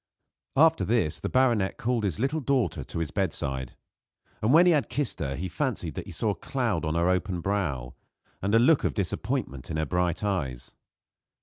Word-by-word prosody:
After 160 +3 +5
this 110 -10 +1
the - - -3
baronet 120 -7 +2
called 120 -2 0
his 90 -6 -2
little 140 +6 0
daughter 115 - 0
to - - -7
his 85 -2 -2
bedside; 70 -9 -2 0.7
and 110 - +2
when 165 +5 +7
he 180 - +6
had 150 -4 +1
kissed 145 -3 -2
her 70 -1 -2
he 90 +5 -3
fancied 95 - -2
that - - -6
he - - -7
saw - - 0
a - - -4
cloud - - -1
on 80 0 -1
her 85 +1 +2
open 90 0 0
brow 80 -11 -2 0.5
and 100 +3 +1
a - - +8
look 135 +6 +4
of - - 0
disappointment 70 - -2
in 80 - -2
her 80 - 0
bright 90 +4 0
eyes. 75 -12 -2
95 Hz, 195 wpm, -27 LUFS, 80-120 Hz, 0.7 s, a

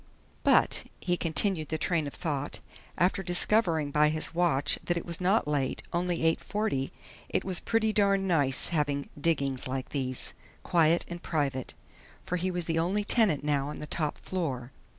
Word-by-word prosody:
But - - +4
he 175 -1 0
continued 165 -1 0
the 160 - -1
train 160 -3 0
of 140 - -8
thought, 145 -3 -3 0.4
after 185 +2 +2
discovering 175 -4 +2
by 150 +1 +4
his 155 +1 -2
watch 155 -5 +1
that 175 - 0
it 170 - -4
was 170 +1 -2
not 190 0 +2
late; 145 -3 -1
only 175 0 0 0.2
8:40 205 -11 -2 0.4
it - - -1
was 185 -2 +1
pretty 220 -1 0
darned 200 -2 +2
nice 145 -7 +4
having 145 -4 -1
"diggings" 140 -4 0
like 130 0 -4
these. 130 -3 -2 0.3
Quiet 165 0 +3
and 175 0 -7
private. 140 -5 -2 0.5
For 180 - -1
he 185 +2 -1
was 175 -2 -3
the 165 0 0
only 190 +5 0
tenant 205 - +3
now 145 -2 0
on 150 - -6
the - - -6
top 150 0 -2
floor. 135 -9 -4
165 Hz, 170 wpm, -29 LUFS, 145-180 Hz, 0.5 s, But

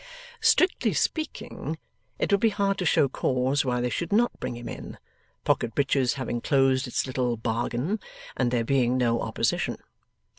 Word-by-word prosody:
Strictly 365 0 +3
speaking, 315 -1 -2 0.4
it - - -1
would 200 - +4
be 225 - +5
hard 200 -1 0
to 180 - 0
show 145 - +4
cause 130 +1 0
why 125 -2 0
they 125 0 -1
should 170 +5 -3
not 235 +4 +2
bring - - -4
him 120 0 -8
in, - - -7 0.5
Pocket 115 - 0
Breaches 135 -3 +2
having 130 -3 -3
closed 135 -1 +2
its 125 - -1
little 125 -2 -1
bargain, 120 - -1 0.4
and 125 -2 +1
there 120 -1 +1
being 130 -1 +2
no 120 -2 +1
opposition. - - -1
130 Hz, 160 wpm, -26 LUFS, 120-165 Hz, 0.5 s, be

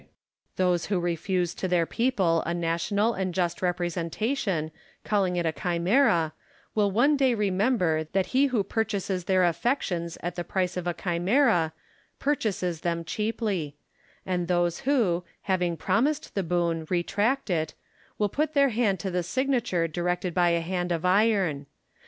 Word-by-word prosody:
Those 180 -2 +1
who 195 -3 0
refuse 175 +1 -1
to 185 - -3
their 175 -2 +2
people 190 -8 +1
a 170 - -2
national 175 +6 0
and 185 -3 -3
just 175 -2 -1
representation, 175 - -1 0.3
calling 195 -4 +1
it 175 -1 0
a 160 - +2
chimera, 170 - +2 0.4
will 210 -2 +2
one 245 +9 +3
day 265 -3 +3
remember 190 -5 +1
that 190 -1 +2
he 275 +2 +4
who 240 -6 +1
purchases 200 -4 -2
their 185 0 +3
affections 175 - 0
at 175 0 -2
the 175 - -4
price 185 +1 -1
of 180 -1 -3
a 175 - -1
chimera, 175 - +2 0.5
purchases 195 - -1
them 170 -1 -1
cheaply; 200 - -2 0.5
and 180 -2 -1
those 175 -1 +1
who, 195 -11 +2 0.2
having 180 -3 0
promised 255 - 0
the 195 - 0
boon, 170 -2 -1
retract 205 +7 0
it, 160 -2 -1 0.4
will 210 - +2
put 305 +8 -2
their 280 -1 +5
hand 215 -5 +1
to 190 - -3
the 180 0 0
signature 240 -4 0
directed 175 +2 -2
by 175 0 +3
a 170 0 +1
hand 175 +1 -2
of 170 +1 -1
iron. 185 -7 +2
180 Hz, 150 wpm, -27 LUFS, 170-215 Hz, 0.5 s, their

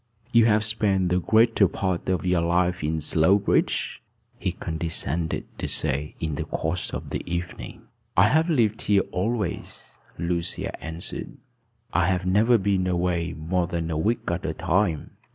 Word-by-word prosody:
"You 115 -2 +6
have 105 -1 +4
spent 100 -4 +1
the 90 +1 +2
greater 110 +1 +4
part 95 -1 -2
of 90 -3 0
your 90 -1 +2
life 90 0 +1
in 80 +1 -1
Slowbridge?" 90 +7 +2 0.4
he - - -1
condescended 80 0 -2
to - - -2
say 70 +3 -1
in 80 -2 -2
the 75 +2 -3
course 80 +2 -3
of - - -6
the - - -2
evening. 85 +1 -5 0.3
"I - - +6
have 160 +3 +3
lived 115 -8 +2
here 100 -1 +3
always," 110 +4 -3 0.2
Lucia 85 0 -2
answered. 80 +1 -6 0.6
"I 85 +2 +3
have 90 -1 0
never 110 +6 +4
been 95 -2 +1
away 90 -1 0
more 85 +3 0
than 85 -1 -3
a - - -1
week 115 +9 +1
at 85 +1 -2
a - - -2
time." 85 -4 0
90 Hz, 155 wpm, -25 LUFS, 85-100 Hz, 0.6 s, You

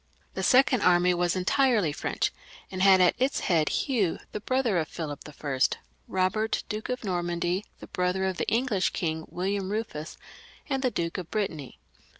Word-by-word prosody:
The - - -3
second 255 -2 +4
army 180 0 +4
was 175 0 +1
en 185 -1 -2
tirely 235 - +3
French, - - -1 0.4
and 185 -1 -4
had 190 -1 +7
at 180 - +5
its 265 +2 +1
head, 160 -4 +2
Hugh 220 - 0
the - - -4
brother 240 -4 +1
of 155 - -2
Philip 150 -4 -5
L; 150 - -11 0.8
Eobert, 190 +4 0
Duke 215 +2 -4
of 250 -1 -3
Normandy, 175 0 -1 0.2
the - - -7
brother 180 +1 -1
of 190 -2 -1
the - - -2
English 225 -3 +1
king, 160 -2 -2
William 190 +1 -2
Eufus; 210 -8 -4 0.5
and 270 -2 -1
the 260 - +2
Duke 170 -4 -3
of 175 - -7
Brittany. 170 - -3
185 Hz, 170 wpm, -27 LUFS, 175-220 Hz, 0.8 s, had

